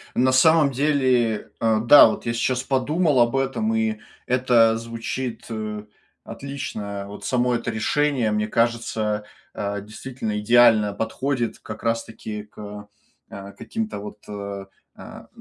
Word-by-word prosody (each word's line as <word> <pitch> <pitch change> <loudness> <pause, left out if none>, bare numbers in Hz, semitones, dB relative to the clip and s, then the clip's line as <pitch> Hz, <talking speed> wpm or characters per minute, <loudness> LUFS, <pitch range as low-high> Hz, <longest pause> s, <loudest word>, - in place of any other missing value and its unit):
На 130 +1 +3
самом 155 +2 +5
деле, 130 -5 +1
а, 110 -1 +2
да, 120 +5 +8
вот 110 - -4
я 115 - -1
щас 125 +2 0
подумал 145 +3 +1
об 120 +2 +3
этом 140 +13 0
и 220 -1 0 0.3
это 120 -3 +3
звучит, 115 +2 -5
э, 110 -1 -5 0.4
отлично. 105 -8 -6
А, - - -10
вот 100 +1 -9
само 125 -1 +1
это 120 +1 -3
решение, 125 +1 +1
мне 105 0 0
кажется, 110 -2 -1 0.3
а, 100 -1 -3
действительно 110 0 -5
идеально 110 -2 +5
подходит 120 +3 -2
как 110 0 -9
раз 115 0 0
таки 105 -1 -7
к, 105 0 -10 0.4
э, 100 0 -9
каким-то 225 - -4
вот, 105 0 -8
э, 100 -1 -6 0.3
а, - - -12
115 Hz, 140 wpm, -23 LUFS, 105-130 Hz, 0.4 s, да